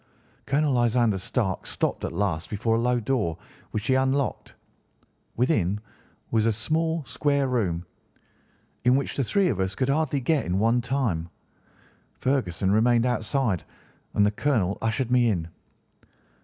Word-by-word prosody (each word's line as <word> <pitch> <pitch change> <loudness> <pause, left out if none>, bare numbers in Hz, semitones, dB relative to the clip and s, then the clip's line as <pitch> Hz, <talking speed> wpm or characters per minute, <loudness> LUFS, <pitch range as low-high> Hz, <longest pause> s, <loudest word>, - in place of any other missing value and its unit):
"Colonel 145 0 +2
Lysander 120 -4 +2
Stark 95 -1 -2
stopped - - -2
at - - -2
last 85 -3 -1
before 110 +2 0
a - - +1
low 125 +1 +2
door, 110 -9 -1 0.3
which 105 0 -3
he 130 - +2
unlocked. 130 +1 0 0.8
Within 105 - +1 0.5
was 110 -1 +2
a - - +4
small, 160 +8 -1
square 140 +2 0
room, 95 -9 -1 1.0
in 125 +1 +5
which 140 - -1
the 135 - +1
three 195 - +2
of 105 - -1
us 95 0 -1
could 130 0 0
hardly 145 -1 +1
get 145 +3 +1
at 90 - -3
one 115 +5 +2
time. 115 -10 -1 0.9
Ferguson 100 -9 0
remained 115 +3 +3
outside, 120 - 0 0.5
and 105 - +4
the 105 - +2
colonel 105 -6 0
ushered 115 +2 -1
me 125 -2 +4
in. 85 -6 -1
120 Hz, 145 wpm, -26 LUFS, 100-135 Hz, 1.0 s, in